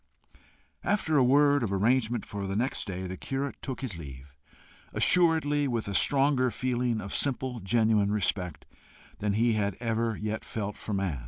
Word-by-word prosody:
After 195 Hz, -6 st, +1 dB
a 135 Hz, -, +5 dB
word 145 Hz, +2 st, +4 dB
of 110 Hz, -4 st, -1 dB
arrangement 115 Hz, +3 st, +1 dB
for 100 Hz, -, -6 dB
next 120 Hz, +1 st, -1 dB
day 95 Hz, -1 st, -4 dB
the 95 Hz, 0 st, -5 dB
curate 135 Hz, +1 st, -4 dB
took 130 Hz, -1 st, -5 dB
his 105 Hz, -11 st, -4 dB
leave, 70 Hz, -2 st, -10 dB, 0.6 s
assuredly 160 Hz, -5 st, +3 dB
with 115 Hz, -5 st, -2 dB
a 100 Hz, -, -3 dB
stronger 135 Hz, +2 st, +3 dB
feeling 125 Hz, -2 st, -1 dB
of 100 Hz, -, -6 dB
simple 130 Hz, -3 st, -1 dB
genuine 110 Hz, -1 st, +2 dB
respect 90 Hz, -6 st, -1 dB, 0.5 s
than 105 Hz, -1 st, 0 dB
he 115 Hz, +2 st, +2 dB
had 100 Hz, -3 st, 0 dB
ever 115 Hz, -2 st, -1 dB
yet 110 Hz, +1 st, -3 dB
felt 105 Hz, -2 st, -4 dB
for 105 Hz, -, -6 dB
man. 95 Hz, -9 st, -1 dB
115 Hz, 160 wpm, -28 LUFS, 100-130 Hz, 0.6 s, a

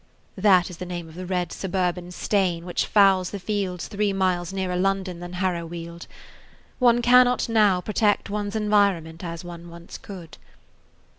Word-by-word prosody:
That 190 Hz, -2 st, +4 dB
is 175 Hz, -, -10 dB
the 180 Hz, -, -6 dB
name 175 Hz, -2 st, -5 dB
of -, -, -14 dB
the 180 Hz, +2 st, -7 dB
red 180 Hz, -1 st, -1 dB
suburban 180 Hz, -2 st, -2 dB
stain 180 Hz, -3 st, 0 dB
which 175 Hz, -, -1 dB
fouls 195 Hz, -3 st, +4 dB
the 205 Hz, -, -5 dB
fields 195 Hz, -2 st, -3 dB
three 205 Hz, 0 st, -1 dB
miles 185 Hz, -2 st, 0 dB
nearer 190 Hz, -2 st, -2 dB
London 190 Hz, -1 st, -1 dB
than 175 Hz, 0 st, -8 dB
Harrowweald. 170 Hz, -2 st, -4 dB, 0.7 s
One 240 Hz, -1 st, +4 dB
cannot 250 Hz, 0 st, +5 dB
now 210 Hz, -5 st, +3 dB
protect 210 Hz, +1 st, +1 dB
one's 205 Hz, +1 st, -3 dB
environment 200 Hz, -6 st, +1 dB
as 170 Hz, -1 st, -6 dB
one 175 Hz, -1 st, -9 dB
once 170 Hz, 0 st, -11 dB
could. 180 Hz, -5 st, -11 dB
185 Hz, 155 wpm, -24 LUFS, 175-205 Hz, 0.7 s, cannot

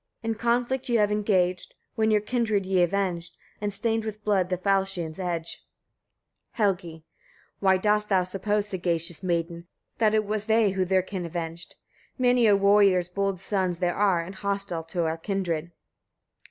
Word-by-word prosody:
In 225 Hz, 0 st, 0 dB
conflict 240 Hz, +3 st, -1 dB
ye 240 Hz, -, +2 dB
have 210 Hz, -2 st, +3 dB
engaged, 185 Hz, -4 st, 0 dB, 0.2 s
when 220 Hz, -1 st, +1 dB
your 210 Hz, -1 st, +3 dB
kindred 215 Hz, -3 st, 0 dB
ye 185 Hz, -1 st, +2 dB
avenged, 175 Hz, -2 st, -1 dB, 0.2 s
and 205 Hz, 0 st, -1 dB
stained 225 Hz, +2 st, -1 dB
with 215 Hz, -1 st, -6 dB
blood 195 Hz, -4 st, +1 dB
the 180 Hz, -, 0 dB
falchion's 190 Hz, -3 st, -1 dB
edge. 170 Hz, -3 st, -4 dB, 0.9 s
Helgi. 195 Hz, -6 st, 0 dB
9. 160 Hz, -1 st, -15 dB, 0.6 s
Why 190 Hz, -1 st, +4 dB
dost 210 Hz, +2 st, +1 dB
thou 190 Hz, -2 st, +3 dB
suppose, 200 Hz, +3 st, -1 dB
sagacious 175 Hz, -3 st, -1 dB
maiden! 170 Hz, -1 st, -2 dB, 0.3 s
that 220 Hz, -1 st, +3 dB
it 215 Hz, -1 st, +2 dB
was 210 Hz, 0 st, -2 dB
they, 220 Hz, -2 st, +3 dB
who 190 Hz, -1 st, 0 dB
their 185 Hz, 0 st, +2 dB
kin 185 Hz, -1 st, -5 dB
avenged? 165 Hz, 0 st, -6 dB, 0.4 s
Many 245 Hz, -2 st, +4 dB
a 205 Hz, -, +6 dB
warrior's 200 Hz, -3 st, +4 dB
bold 195 Hz, 0 st, -1 dB
sons 190 Hz, -2 st, -1 dB
there 175 Hz, 0 st, 0 dB
are, 195 Hz, -4 st, +2 dB
and 185 Hz, +3 st, -8 dB
hostile 195 Hz, -3 st, -3 dB
to 170 Hz, 0 st, -2 dB
our 160 Hz, 0 st, -1 dB
kindred. 175 Hz, -3 st, -3 dB
195 Hz, 165 wpm, -26 LUFS, 175-210 Hz, 0.9 s, a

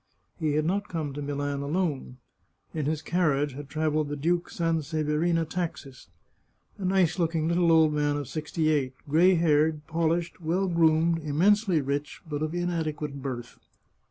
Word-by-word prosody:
He 155 Hz, -3 st, 0 dB
had 155 Hz, +1 st, +1 dB
not 200 Hz, +4 st, 0 dB
come 155 Hz, -5 st, -3 dB
to 145 Hz, -, -5 dB
Milan 145 Hz, 0 st, -2 dB
alone. 145 Hz, -4 st, -2 dB, 0.6 s
In 155 Hz, -3 st, -2 dB
his 155 Hz, 0 st, -1 dB
carriage 150 Hz, -5 st, +1 dB
had 140 Hz, +1 st, -8 dB
travelled 155 Hz, -1 st, 0 dB
the 145 Hz, -, -3 dB
Duke 170 Hz, +4 st, 0 dB
Sanseverina 160 Hz, 0 st, 0 dB
Taxis 160 Hz, -6 st, -5 dB, 0.4 s
— -, -, -41 dB
a 195 Hz, -, -3 dB
nice 185 Hz, -2 st, +2 dB
looking 160 Hz, -2 st, 0 dB
little 170 Hz, 0 st, +3 dB
old 160 Hz, -2 st, +5 dB
man 145 Hz, -1 st, +1 dB
of 145 Hz, -3 st, -4 dB
sixty 155 Hz, +2 st, -1 dB
eight, 135 Hz, -4 st, 0 dB
gray 175 Hz, +6 st, +5 dB
haired, 155 Hz, -2 st, +2 dB
polished, 165 Hz, +3 st, -1 dB
well 175 Hz, +4 st, 0 dB
groomed, 165 Hz, -1 st, +3 dB
immensely 175 Hz, +4 st, +2 dB
rich, 140 Hz, +2 st, -3 dB
but 150 Hz, -1 st, -4 dB
of 155 Hz, +2 st, -2 dB
inadequate 155 Hz, -5 st, -2 dB
birth. 125 Hz, -3 st, -6 dB
155 Hz, 155 wpm, -27 LUFS, 145-170 Hz, 0.6 s, old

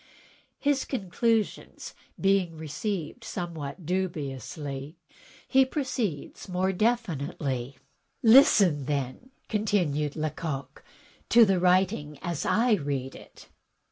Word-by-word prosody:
His 285 Hz, -2 st, +1 dB
conclusions 225 Hz, 0 st, -1 dB, 0.3 s
being 190 Hz, -4 st, +2 dB
received 160 Hz, -, -4 dB
somewhat 170 Hz, -5 st, -6 dB
dubiously 145 Hz, -4 st, -4 dB, 0.5 s
he 265 Hz, 0 st, +5 dB
proceeds 250 Hz, -, -3 dB
more 185 Hz, +1 st, 0 dB
definitely. 150 Hz, -, -1 dB, 0.5 s
"Listen, 205 Hz, -, +6 dB
then," 140 Hz, -, -3 dB, 0.2 s
continued 175 Hz, -9 st, 0 dB
Lecoq, 155 Hz, -2 st, -4 dB, 0.5 s
"to 235 Hz, -1 st, +8 dB
the 195 Hz, -3 st, +2 dB
writing 180 Hz, -4 st, +2 dB
as 170 Hz, -5 st, -2 dB
I 235 Hz, +2 st, +3 dB
read 140 Hz, -7 st, -2 dB
it. -, -, -14 dB
175 Hz, 90 wpm, -27 LUFS, 145-210 Hz, 0.5 s, to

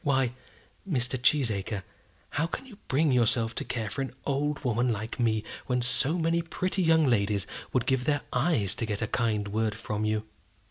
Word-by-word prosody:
"Why, 135 Hz, -4 st, +2 dB, 0.6 s
Mr. 125 Hz, -5 st, 0 dB
Cheesacre, 110 Hz, -7 st, +1 dB, 0.5 s
how 150 Hz, +3 st, 0 dB
can 260 Hz, -, -5 dB
you 220 Hz, -6 st, -14 dB
bring 145 Hz, +2 st, +3 dB
yourself 115 Hz, -2 st, +3 dB
to -, -, -2 dB
care 115 Hz, -3 st, -3 dB
for 105 Hz, +6 st, -3 dB
an 130 Hz, -1 st, -4 dB
old 145 Hz, +1 st, -1 dB
woman 120 Hz, +1 st, +2 dB
like 110 Hz, +3 st, -4 dB
me, 110 Hz, -2 st, +2 dB, 0.2 s
when 125 Hz, -1 st, +1 dB
so 135 Hz, +6 st, +2 dB
many 165 Hz, 0 st, +2 dB
pretty 185 Hz, +3 st, -1 dB
young 160 Hz, -2 st, +5 dB
ladies 100 Hz, -5 st, +2 dB, 0.3 s
would 125 Hz, -2 st, +1 dB
give 130 Hz, -1 st, +1 dB
their 145 Hz, -1 st, +2 dB
eyes 125 Hz, -, +2 dB
to 115 Hz, -, -2 dB
get 105 Hz, +1 st, -1 dB
a -, -, -1 dB
kind 105 Hz, -3 st, 0 dB
word 110 Hz, 0 st, 0 dB
from 110 Hz, -1 st, -3 dB
you?" 110 Hz, 0 st, 0 dB
125 Hz, 185 wpm, -28 LUFS, 110-145 Hz, 0.6 s, young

